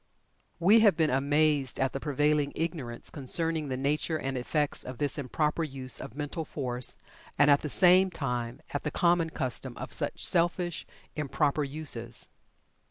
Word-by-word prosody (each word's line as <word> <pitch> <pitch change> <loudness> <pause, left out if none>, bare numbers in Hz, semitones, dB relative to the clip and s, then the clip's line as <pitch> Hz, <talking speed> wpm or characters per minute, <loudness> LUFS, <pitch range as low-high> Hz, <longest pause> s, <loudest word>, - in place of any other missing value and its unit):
We 195 +7 +6
have 215 -3 +5
been 160 -2 +2
amazed 145 0 +2
at 135 0 +1
the 135 - -3
prevailing 145 0 +1
ignorance 155 -8 -4
concerning 160 +2 -1
the 130 -1 -3
nature 150 +4 0
and 135 -2 -3
effects 145 +4 -1
of 130 -1 -7
this 145 +2 -1
improper 150 +4 -1
use 130 -4 -2
of 110 - -8
mental 150 +2 -4
force, 125 -5 -2 0.4
and 145 0 +6
at 140 - +5
the 150 - -4
same 185 +4 +6
time, 125 -6 -4
at 145 - -1
the 150 - -2
common 170 +1 +2
custom 130 -3 -3
of - - -6
such - - -2
selfish, 175 0 0 0.3
improper 150 0 0
uses. 135 -5 -4
145 Hz, 160 wpm, -29 LUFS, 135-160 Hz, 0.4 s, We